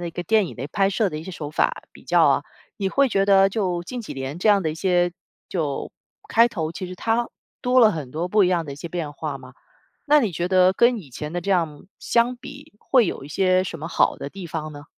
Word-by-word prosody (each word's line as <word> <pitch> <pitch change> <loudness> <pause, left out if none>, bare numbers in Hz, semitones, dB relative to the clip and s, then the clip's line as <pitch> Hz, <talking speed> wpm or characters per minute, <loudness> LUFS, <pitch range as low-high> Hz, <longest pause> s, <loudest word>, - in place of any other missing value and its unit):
的 175 - -4
一 - - -7
个 175 - -5
电 215 +1 +2
影 - - -9
的 135 +4 -5
拍 195 -1 +2
摄 200 0 0
的 155 - -5
一 - - -7
些 190 - -7
手 150 -4 -6
法 150 - 0
比 - - -17
较 - - +4
啊， - - +3 0.4
你 195 - 0
会 275 +7 +3
觉 195 0 +2
得 195 -1 +5
就 185 -5 -1
近 245 +8 -6
几 215 - -8
年 135 +4 -5
这 215 - +1
样 200 -2 +5
的 160 - -1
一 - - -5
些 175 0 +1 0.3
就 155 -6 -3 0.3
开 230 +1 +4
头， 165 -7 -4
其 185 - -6
实 185 - -7
它 230 +5 0 0.3
多 250 0 +3
了 220 -2 +7
很 145 -6 -6
多 165 +5 -3
不 210 +1 +4
一 180 - +2
样 175 -3 +1
的 140 - -7
一 - - -9
些 170 - -7
变 165 -3 -4
化 145 -1 -5
吗？ 130 -1 -13 0.5
那 300 0 +5
你 220 -7 -1
觉 175 +2 -2
得 185 0 +5
跟 235 +4 +3
以 145 -9 -12
前 150 +5 -6
的 175 - -1
这 200 - -3
样 165 -6 0
相 240 +1 +1
比， 275 +2 -12
会 250 -6 +3
有 135 - -4
一 - - -10
些 185 +3 +2
什 170 -3 -6
么 160 - -6
好 170 - +2
的 140 - -7
地 190 -3 -8
方 155 -1 -5
呢？ 145 0 -10
180 Hz, 285 characters per minute, -23 LUFS, 155-210 Hz, 0.5 s, 了